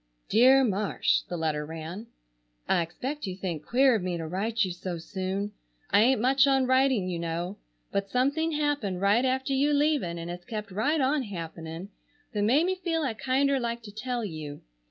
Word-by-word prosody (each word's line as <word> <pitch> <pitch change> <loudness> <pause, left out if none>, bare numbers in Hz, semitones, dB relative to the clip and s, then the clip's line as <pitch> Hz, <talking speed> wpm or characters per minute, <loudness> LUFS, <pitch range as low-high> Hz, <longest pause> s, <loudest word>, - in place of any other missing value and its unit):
"DEAR 260 +5 +6
MARSH,"—the 200 -4 0
letter 155 -2 -1
ran:— 165 +7 -7 0.6
"I - - +3
expect 255 - -4
you 185 - -4
think 175 -5 -4
queer 260 - +4
of 220 - +1
me 180 -1 -2
to 165 - -4
write 210 +7 0
you 185 - -3
so 180 0 -5
soon. 190 +4 -3 0.4
I 200 - +6
ain't 255 +2 +4
much 265 +4 +4
on 270 -1 +3
writing 260 -6 +3
you 175 -2 -3
know, 170 +4 -3 0.3
but 200 0 -1
something 285 +8 +1
happened 290 -11 -1
right 200 +5 +3
after 265 +1 0
you 280 +2 +2
leaving 285 - +1
and 165 0 -6
has 175 0 -7
kept 210 0 -6
right 275 +12 +1
on 280 +2 +2
happening 165 -3 -7 0.4
that 210 - -1
made 260 +11 +4
me 375 - +1
feel 340 -3 -2
I 260 -5 -1
kinder 270 +4 +1
like 235 -1 -3
to 210 - -9
tell 235 +2 -3
you. 155 -5 -7
215 Hz, 185 wpm, -28 LUFS, 180-265 Hz, 0.6 s, DEAR